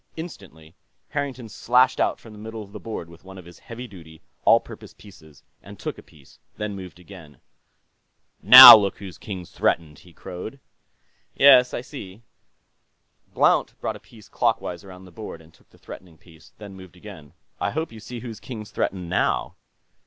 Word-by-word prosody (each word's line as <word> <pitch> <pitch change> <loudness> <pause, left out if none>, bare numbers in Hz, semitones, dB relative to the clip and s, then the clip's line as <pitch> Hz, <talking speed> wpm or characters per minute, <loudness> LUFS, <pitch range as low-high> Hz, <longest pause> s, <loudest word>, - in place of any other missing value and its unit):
Instantly, 90 - -11 0.4
Harrington 135 -5 -5
slashed 125 +4 +1
out - - -1
from 115 - -15
the 105 - -14
middle 110 0 -8
of 100 - -17
the - - -10
board 110 -7 -7
with 85 0 -18
one 95 0 -13
of 90 - -13
his 85 -1 -16
heavy 120 +2 -10
duty, 80 -6 -15 0.3
all - - +5
purpose - - -14
pieces 85 -8 -18 0.2
and - - -14
took - - -7
a - - -12
piece, 70 -3 -22 0.2
then 105 -1 -5
moved 90 -2 -11
again. 85 -6 -15 1.0
"Now - - +12
look 100 -3 -1
whose 95 -3 -11
king's 95 -4 -9
threatened!" 75 -3 -2
he 90 - -19
crowed. 90 +10 -10 0.8
"Yes, 130 -3 +6
I - - -5
see." 115 -6 -12 1.1
Blount - - +1
brought - - -4
a - - -12
piece 110 -3 -19
clockwise 90 +1 -2
around 95 -1 -14
the 90 - -16
board 105 -3 -10
and 80 0 -20
took - - -28
the - - -24
threatening 85 -3 -13
piece, 80 +3 -20
then 100 -2 -12
moved 95 -1 -15
again. 90 -7 -13 0.3
"I - - -2
hope 160 +8 -5
you 110 - -12
see 115 +2 -10
whose 115 -3 -9
king's 110 -5 -10
threatened, 90 -2 -4
now." 90 - -2
95 Hz, 180 wpm, -22 LUFS, 85-115 Hz, 1.1 s, Now